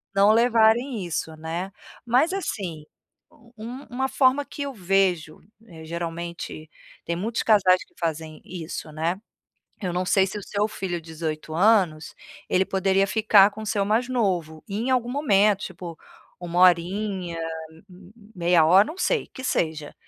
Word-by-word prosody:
não 200 +2 +6
levarem 230 -1 +3
isso, 160 -1 -4
né. 165 +5 -5 0.3
Mas, 260 +10 +2
assim, 185 - -4 0.7
um 245 +5 -8
uma 265 +2 -1
forma 270 +1 +3
que 285 - -6
eu 280 -1 -5
vejo, 185 -5 0 0.3
eh, 160 -2 -12
geralmente 170 -1 -6 0.4
tem 170 - -2
muitos 220 +6 -2
casais 190 -4 +4
que - - -33
fazem 160 -2 -4
isso, 165 -3 -7
né. 165 +5 -2 0.6
Eu 180 -2 -2
não 180 +1 0
sei 190 0 +3
se 200 +2 -5
o - - -8
seu 210 +2 -1
filho 175 -5 -4
de 165 - -17
18 155 -1 -5
anos 180 -5 +2 0.4
ele 190 +1 +3
poderia 195 0 +2
ficar 210 -2 +5
com 220 +2 -9
o - - -7
seu 205 -2 0
mais 225 +5 +1
novo, 180 -10 -1
em 220 +6 -2
algum 245 -1 +1
momento, 210 -7 +3
tipo 175 -3 -9 0.4
1 175 0 -2
horinha, 180 0 +2 1.0
meia 170 -2 +3
hora, 190 +5 +6
não 325 - -7
sei, 480 +3 0
que 260 - -10
seja. 155 - -2
190 Hz, 150 wpm, -24 LUFS, 170-220 Hz, 1.0 s, não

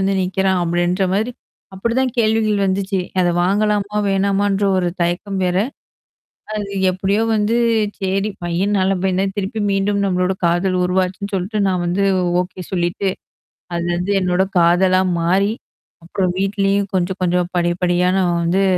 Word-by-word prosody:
வந்து 195 0 +1
நீக்கிறான், 190 0 0
அப்பிடின்ற 175 +2 0
மாரி. 220 +5 0 0.4
அப்பிடிதான் 235 +6 0
கேள்விகள் 215 -2 +2
வந்துச்சு. 190 0 -1 0.2
அத 175 - +2
வாங்கலாமா! 210 +2 0
வேணாமான்ற 200 +1 +1
ஒரு 180 -1 0
தயக்கம் 190 +3 -2
வேற. 180 0 0 1.0
அது 205 -2 -4 0.2
எப்பிடியோ 195 +4 0
வந்து 215 +2 +1 0.4
சரி 195 +2 -1
பையன் 185 +4 0
நல்ல 190 +1 +2
பையந்தான் 190 +1 0
திருப்பி 200 +3 -3
மீண்டும் 200 +1 0
நம்மளோட 185 0 0
காதல் 175 +2 +1
உருவாச்சுன்னு 185 +2 -1
சொல்ட்டு 200 +3 -2
நான் 180 -2 0
வந்து 185 +3 0 0.4
ஓகே 185 0 -9
சொல்லிட்டு. 175 +2 0 0.6
அது 170 0 -2
வந்து 180 +3 -2
என்னோட 180 +1 +2 0.2
காதலா 185 +2 +4 0.2
மாறி, 195 +5 +2 0.5
அப்புறம் 180 +1 -1
வீட்லயும் 195 0 0
கொஞ்சம் 185 +1 -2
கொஞ்சம் 180 0 0
படி, 175 0 +2
படியா 180 +1 +2
நான் 175 -2 +1
வந்து 180 +4 +2
190 Hz, 135 wpm, -19 LUFS, 180-200 Hz, 1.0 s, காதலா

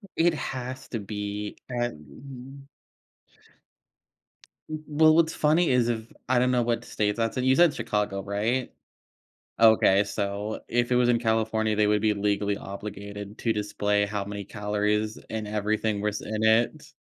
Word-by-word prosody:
It 170 +1 +3
has 130 -1 -5
to 115 - -3
be. 105 0 -5
And 125 - -6 2.0
W 155 0 -5
well 155 +1 +5
what's 165 -1 +3
funny 160 +3 +3
is 125 -2 +3
if 115 -1 -3 0.2
I 130 0 +2
don't 125 +1 +2
know 125 -1 +2
what 115 0 -1
state 105 -1 -1
that's 115 +1 -1
in, 125 - 0
you 130 +1 +4
said 170 -1 +5
Chicago, 105 -5 -2
right? 105 +6 -1 0.9
Okay. 110 -3 +6
So 100 +1 -3
if 120 0 0
it 125 - +3
was 125 0 +3
in 120 - +3
California, 110 -1 0
they 105 0 +3
would 105 0 +2
be 110 -1 +3
legally 100 0 0
obligated 100 +1 -7
to 115 - +1
display 105 -1 0
how 100 -1 -3
many 100 0 -6
calories 105 +1 -1
and 110 -1 -3
everything 105 0 -1
was 105 0 -2
in 110 0 -3
it. 110 +2 +2
110 Hz, 155 wpm, -26 LUFS, 105-125 Hz, 2.0 s, Okay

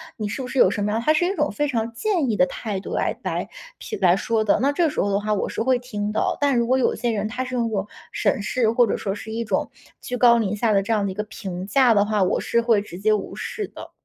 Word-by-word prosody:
你 210 -2 -4
是 235 - -4
不 255 - -5
是 270 - -5
有 - - +6
什 205 - -3
么 - - 0
样 225 +2 0
“他 310 - +5
是 315 +3 +2
一 380 +3 -1
种 - - 0
非 295 -1 -1
常 230 -4 -2
建 335 - 0
议 - - 0
的 180 - +5
态 200 +2 -4
度 190 - -7
来 - - -1
来 - - -3 0.3
评 - - -6
来 180 -2 +5
说 225 +3 0
的， 210 - +3
那 275 +2 +3
这 325 +2 +2
时 300 - -1
候 200 - 0
的 200 - +2
话 210 +1 -1
我 205 - -1
是 - - -3
会 255 +2 +3
听 210 -4 -4
的。 - - 0
但 280 -3 +2
如 235 - +2
果 260 +2 +3
有 260 - +1
些 240 -1 -1
人 215 -1 -1
他 245 +4 -3
是 255 0 -5
用 235 -2 +1
那 - - -3
种 195 -1 -1 0.3
审 - - +1
视 225 +2 +1
或 240 +1 +4
者 - - 0
说 195 - -3
是 220 +1 -8
一 230 +1 -2
种 - - -1 0.3
居 250 - -4
高 240 -1 +6
临 210 -3 0
下 220 +1 +1
的 195 -1 +3
这 205 - -3
样 210 -2 +1
的 195 - -2
一 - - -8
个 210 - -2
评 190 -4 -6
价 250 +3 +4
的 205 -2 +4
话， 210 -1 0
我 180 - +1
是 235 - +1
会 230 -3 +3
直 185 -3 -9
接 215 +2 +3
无 210 - -3
视 425 -3 -4
的。 - - -11
225 Hz, 330 characters per minute, -23 LUFS, 205-250 Hz, 0.3 s, 有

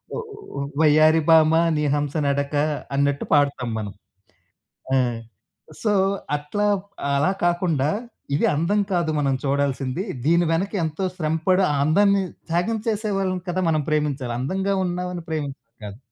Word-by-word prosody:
ఒ - - -3 0.4
ఒ - - -2 0.2
వయ్యారి 155 +1 +5
భామ 160 -1 +6 0.2
నీ 150 - 0
హంస 145 -1 -2
నడక 140 +1 -1 0.4
అన్నట్టు 140 0 +1
పాడతాం 140 -4 +2
మనం. 105 -2 -5 1.0
ఆ! - - +4 0.9
సో, 210 -2 +2 0.4
అట్లా 175 +9 -2 0.5
అలా 145 +7 +2
కాకుండా 170 -5 +1 0.5
ఇది - - +2
అందం 170 +8 +1
కాదు 170 -3 +1
మనం 135 -2 +1
చూడాల్సింది. 140 +2 -1 0.2
దీని 170 +3 +3
వెనక 190 +5 -1
ఎంతో 160 +4 -3
శ్రమపడి 165 +4 +1
ఆ - - +1
అందాన్ని 200 +5 +3 0.3
త్యాగం 180 +7 0
చేసే 215 -1 -1
వాళ్ళని 185 -2 -1
కదా! 185 +1 -1
మనం 155 -1 +1
ప్రేమించాలి. 145 -5 -1
అందంగా 190 +9 -1
ఉన్నామని 180 0 -3
ప్రేమించడం 145 -5 -4 0.2
కాదు. 100 +2 -8
155 Hz, 135 wpm, -23 LUFS, 140-180 Hz, 1.0 s, భామ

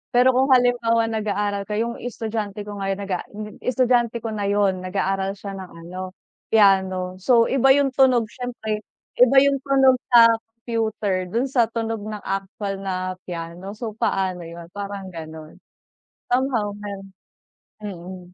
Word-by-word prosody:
Pero 250 +1 +6
kung 260 +1 +2
halimbawa 240 -2 +3
nag-aaral 205 -2 -1
ka, 210 - -3
'yung 235 +2 -2
estudyante 215 -3 -4
ko 205 0 -7
ngayon 195 0 -2
nag-a 185 -2 -2
hmm, 210 0 -9
estudyante 240 -2 +1
ko 225 - -3
na 205 -2 -2
'yun 200 -2 +2
nag-aaral 195 +1 -1
siya 200 0 -7
ng 190 -2 -8 0.2
ano 185 +1 -7 0.3
piano, 190 -3 +3
so 235 +4 +4
iba 270 0 +5
'yung 280 -1 +2
tunog 255 -3 +4
siyempre, 240 -4 -4 0.4
iba 250 +2 +6
'yung 280 -1 +2
tunog 265 -1 +4
sa 230 -2 +8
computer 225 -5 -2
do'n 235 +8 0
sa 240 -4 +3
tunog 225 0 -3
ng 210 -1 -6
actual 195 0 -4
na 185 -1 -3
piano. 175 +3 -6
So 225 0 -5
paano 185 -3 -1
'yun, 170 0 -10
parang 200 -1 -6
gano'n. 160 -2 -9 0.7
Somehow 245 -5 +1
'yun, 200 -1 -6 0.8
mm. 185 -2 -7
210 Hz, 145 wpm, -23 LUFS, 190-235 Hz, 0.8 s, sa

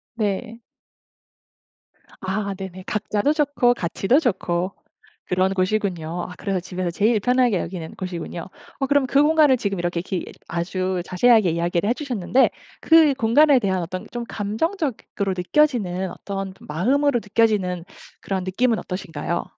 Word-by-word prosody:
네. 220 +1 -2 1.6
아 200 +1 -2
네네. 190 -1 -8
각자도 215 +5 0
좋고 285 -5 +2
같이도 195 - +1
좋고 185 - -1 0.5
그런 185 +1 +1
곳이군요. 185 -4 -1
아 - - -8
그래서 195 -2 -1
집에서 180 0 -4
제일 215 +6 +2
편하게 245 -3 +2
여기는 165 -2 -6
곳이군요. 175 -2 -5 0.3
어 270 - +1
그럼 285 0 +3
그 275 +2 +3
공간을 300 -3 +5
지금 200 -4 -2
이렇게 175 0 -1
기 185 0 -4 0.2
아주 185 +1 -2
자세하게 215 0 +4
이야기를 170 +3 0
해주셨는데 250 - +1 0.3
그 320 -3 +6
공간에 270 +3 +4
대한 190 -4 0
어떤 180 +2 -5
좀 240 -1 -4
감정적으로 220 - -2
느껴지는 190 -4 +1
어떤 195 -1 -5
마음으로 250 - +1
느껴지는 205 -5 +1 0.4
그런 190 -2 -2
느낌은 225 +5 +1
어떠신가요? 175 -2 -4
200 Hz, 320 characters per minute, -22 LUFS, 180-245 Hz, 1.6 s, 그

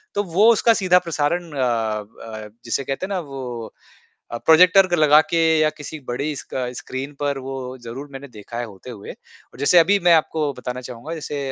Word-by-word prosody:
तो 205 - +1
वो 200 +6 +4
उसका 230 +1 +4
सीधा 180 -1 +5
प्रसारण 165 +2 -1
अ 145 - -7
अ, 110 -2 -3 0.2
जिसे 115 +4 -1
कहते 135 +7 -3
हैं 195 - -9
ना 190 - 0
वो 130 -7 -7 0.6
अ, 120 - -3
प्रॉजेक्टर 180 +3 +6
लगा 150 -1 +6
के 165 - -2 0.2
या 155 - +4
किसी 155 +1 -8
बड़ी 140 +5 -2
स्क 140 - -10 0.2
स्क्रीन 135 +3 -6
पर 145 -1 -1
वो 135 +1 -6 0.3
ज़रूर 125 +5 -8
मैंने 135 +1 -9
देखा 115 -1 -10
है 120 - -2
होते 105 +2 -12
हुए। 105 -5 -8
और - - -20
जैसे 145 +5 +4
अभी 200 +5 +4
मैं 170 - +8
आपको 155 -2 +1
बताना 125 -1 -6
चाहूँगा 125 +5 -8
जैसे 150 -2 -5
140 Hz, 195 wpm, -21 LUFS, 120-165 Hz, 0.6 s, मैं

